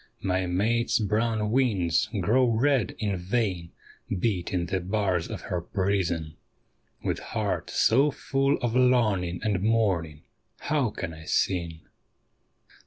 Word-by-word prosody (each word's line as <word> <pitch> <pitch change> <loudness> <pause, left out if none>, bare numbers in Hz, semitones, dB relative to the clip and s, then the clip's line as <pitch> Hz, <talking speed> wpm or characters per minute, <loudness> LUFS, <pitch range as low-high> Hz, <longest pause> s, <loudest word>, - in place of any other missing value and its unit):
My 95 -1 0
mate's 110 +6 +1
brown 110 0 0
wings 110 -7 +2
grow 120 +9 +3
red 120 -1 +1
in 100 -3 -1
vain 90 -3 -2 0.5
beating 90 -3 -1
the 95 +2 -1
bars 95 -2 -1
of - - -6
her 90 -2 -3
prison; 85 -5 -1 0.7
With - - -1
heart - - -3
so 135 +6 +3
full 135 0 0
of 120 -1 0
longing 110 -9 +2
and 100 -4 0
mourning, 95 -9 0 0.4
how 145 -5 +1
can 95 -5 -5
I 80 0 -11
sing? 85 -3 0
100 Hz, 120 wpm, -27 LUFS, 90-115 Hz, 0.7 s, grow